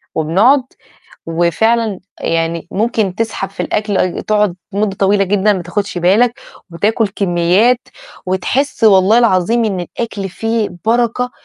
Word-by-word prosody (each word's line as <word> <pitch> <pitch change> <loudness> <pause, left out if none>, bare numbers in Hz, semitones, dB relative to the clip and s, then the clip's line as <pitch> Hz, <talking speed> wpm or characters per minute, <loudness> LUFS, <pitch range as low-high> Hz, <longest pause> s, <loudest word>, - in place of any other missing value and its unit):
وبنقعد، 205 - +3 0.6
وفعلاً 195 +6 0 0.2
يعني 165 0 -2
ممكن 215 -2 -1
تسحب 220 -2 -3
في 195 - -9
الأكل، 210 -2 -1
آي 185 - -1
تقعد 210 -4 +1 0.2
مُدّة 200 -1 -1
طويلة 195 +1 +2
جدًا 205 +2 +2
ما 185 -3 -3
تاخدش 190 +2 -3
بالك 230 +9 +2 0.3
وتاكل 210 +5 0
كميّات 195 +6 +1 0.4
وتحس 225 +8 -1
والله 200 +1 +5
العظيم 230 +1 +2
إن 195 -4 -1
الأكل 200 +2 -5
فيه 225 +3 -2 0.2
بركة 240 +2 +1
205 Hz, 125 wpm, -15 LUFS, 185-225 Hz, 0.6 s, والله